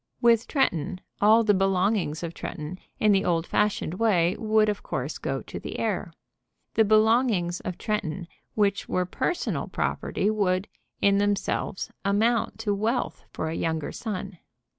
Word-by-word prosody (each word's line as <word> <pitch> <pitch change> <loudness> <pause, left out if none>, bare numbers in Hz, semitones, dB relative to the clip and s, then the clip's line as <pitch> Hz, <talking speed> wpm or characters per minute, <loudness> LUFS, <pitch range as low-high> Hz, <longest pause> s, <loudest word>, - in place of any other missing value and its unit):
With 235 -1 +4
Tretton, 180 - 0 0.2
all 220 +3 +6
the 210 -2 +4
belongings 190 -4 +1
of 170 0 -4
Tretton, 155 +4 -6 0.2
in 215 - +4
the 195 -1 +3
old 165 -1 +1
fashioned 210 -5 0
way, 185 -6 +3
would, 215 -1 +3
of 210 -1 -1
course, - - -4
go - - -3
to - - -7
the - - -6
heir. - - -1 0.6
The 220 - +5
belongings 215 -4 +3
of 180 - -5
Tretton, 190 -5 -2 0.3
which 200 -2 +1
were 180 0 +1
personal 340 - -2
property, 200 - -1
would, 195 -2 +1 0.3
in 200 0 +4
themselves, 205 -2 -1
amount 215 +4 +1
to 210 -2 0
wealth 225 +5 -1
for 160 - -3
a - - -3
younger 160 -2 -2
son. 195 -5 -5
200 Hz, 150 wpm, -26 LUFS, 180-215 Hz, 0.6 s, all